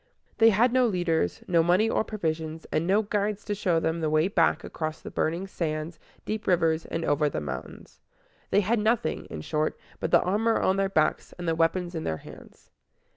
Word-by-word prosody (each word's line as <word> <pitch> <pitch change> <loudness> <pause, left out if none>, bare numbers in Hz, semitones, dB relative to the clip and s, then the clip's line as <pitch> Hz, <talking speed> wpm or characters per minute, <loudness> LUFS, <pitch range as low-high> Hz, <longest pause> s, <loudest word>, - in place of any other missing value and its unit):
They 225 0 +8
had 230 +4 +3
no 255 -1 +4
leaders, 175 - 0
no 170 -2 +4
money 180 +6 +3
or 225 - +1
provisions, 160 -6 -3
and 160 +2 0
no 205 +3 +3
guides 205 0 -1
to 210 - -1
show 185 -5 +1
them 160 +1 -1
the 155 - 0
way 155 +3 +3
back 180 -4 +2
across 155 -1 -4
the - - -9
burning 170 +4 -1
sands, 160 -3 -4 0.3
deep 215 0 -4
rivers, 165 -3 +2
and 165 - -3
over 145 +1 +2
the - - -3
mountains. 75 -4 -8 0.5
They 205 - +4
had 220 +4 +1
nothing, 225 +2 0
in 80 - -7
short, 155 - -1 0.2
but - - -2
the - - +5
armor 215 +5 +1
on 190 - +2
their 195 0 +1
backs 155 -5 0
and 175 -1 -6
the 165 - +2
weapons 170 +2 0
in 160 -2 -4
their 80 - -2
hands. - - -15
175 Hz, 200 wpm, -27 LUFS, 160-205 Hz, 0.5 s, They